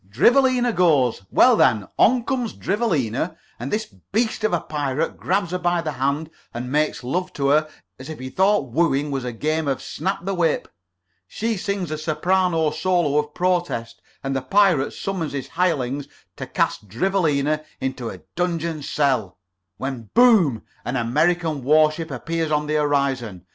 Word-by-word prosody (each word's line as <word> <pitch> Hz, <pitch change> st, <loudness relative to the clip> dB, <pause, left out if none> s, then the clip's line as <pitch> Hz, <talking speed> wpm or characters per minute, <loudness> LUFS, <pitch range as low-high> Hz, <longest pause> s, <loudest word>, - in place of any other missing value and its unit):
"Drivelina 245 Hz, -, +3 dB
goes. 145 Hz, -, +3 dB
Well, -, -, +6 dB
then, 105 Hz, -4 st, +3 dB
on 245 Hz, +1 st, +5 dB
comes 250 Hz, -3 st, -2 dB
Drivelina, 165 Hz, -, -1 dB, 0.2 s
and 125 Hz, +4 st, -5 dB
this 215 Hz, +1 st, 0 dB
beast 215 Hz, -, -3 dB
of 215 Hz, -, +2 dB
a 175 Hz, -, +2 dB
pirate 150 Hz, 0 st, -2 dB
grabs 185 Hz, -1 st, -1 dB
her 180 Hz, -, -1 dB
by 175 Hz, -1 st, +1 dB
the 155 Hz, -, -2 dB
hand 140 Hz, +4 st, -1 dB, 0.2 s
and 125 Hz, +2 st, -4 dB
makes 150 Hz, -2 st, 0 dB
love 180 Hz, +8 st, -2 dB
to 140 Hz, -1 st, 0 dB
her 155 Hz, +2 st, +3 dB, 0.3 s
as 130 Hz, +3 st, -9 dB
if 155 Hz, -, -6 dB
he 130 Hz, 0 st, -7 dB
thought 190 Hz, -, +2 dB
wooing 150 Hz, -1 st, +1 dB
was 135 Hz, -2 st, -2 dB
a 125 Hz, -, -3 dB
game 155 Hz, +6 st, -1 dB
of 135 Hz, -2 st, 0 dB
snap 190 Hz, -2 st, -4 dB
the 195 Hz, -, -1 dB
whip. 170 Hz, -4 st, 0 dB, 0.6 s
She 225 Hz, +1 st, -2 dB
sings 195 Hz, -4 st, -3 dB
a 155 Hz, -, -3 dB
soprano 165 Hz, +1 st, +1 dB
solo 175 Hz, -6 st, +1 dB
of 150 Hz, 0 st, -4 dB
protest, 175 Hz, -11 st, -1 dB, 0.2 s
and 135 Hz, 0 st, -2 dB
the 135 Hz, -, 0 dB
pirate 190 Hz, -4 st, +3 dB
summons 185 Hz, -7 st, -3 dB
his 135 Hz, -3 st, -4 dB
hirelings 145 Hz, -6 st, -1 dB, 0.3 s
to -, -, -6 dB
cast 105 Hz, -, -1 dB
Drivelina 155 Hz, -, 0 dB, 0.2 s
into 130 Hz, -3 st, -3 dB
a 90 Hz, -, -9 dB
Donjuan 170 Hz, -3 st, -1 dB
cell, 135 Hz, -9 st, 0 dB, 0.4 s
when 130 Hz, -5 st, -5 dB
boom! 215 Hz, -, +5 dB, 0.2 s
an 125 Hz, -, -3 dB
American 155 Hz, +5 st, +1 dB
war 155 Hz, +3 st, +5 dB
ship 160 Hz, +1 st, -6 dB
appears 160 Hz, +4 st, -3 dB
on 150 Hz, 0 st, +1 dB
the 150 Hz, -, -2 dB
horizon. 135 Hz, -, 0 dB
155 Hz, 165 wpm, -22 LUFS, 135-180 Hz, 0.6 s, Well